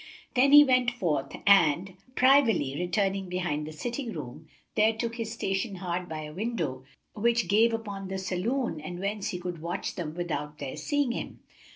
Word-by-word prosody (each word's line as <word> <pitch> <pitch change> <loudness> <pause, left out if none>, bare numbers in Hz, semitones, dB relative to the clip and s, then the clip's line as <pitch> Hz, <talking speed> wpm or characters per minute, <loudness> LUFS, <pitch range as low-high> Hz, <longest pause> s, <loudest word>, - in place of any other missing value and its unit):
Then 270 +2 +4
he 295 0 +11
went 255 -3 +3
forth 165 - -2
and, 185 -1 +4 0.2
privily 250 - +4
returning 195 +2 -1
behind 175 -5 -2
the - - -6
sitting 235 - -4
room, 150 0 -8 0.3
there 220 +1 +4
took 230 +1 -4
his 225 -2 -3
station 195 -2 -2
hard 180 -1 -4
by 155 -1 -4
a 150 0 -8
window 170 - -3 0.3
which 235 -1 +1
gave 220 +5 +4
upon 205 -4 -4
the 190 0 -4
saloon 190 - -2
and 175 +3 -6
whence 200 +2 -2
he 185 - -3
could 175 -2 -6
watch 175 +3 -3
them 160 -3 -5
without 155 -4 -4
their 140 -3 -5
seeing 285 -4 0
him. - - -6
195 Hz, 175 wpm, -28 LUFS, 170-230 Hz, 0.3 s, he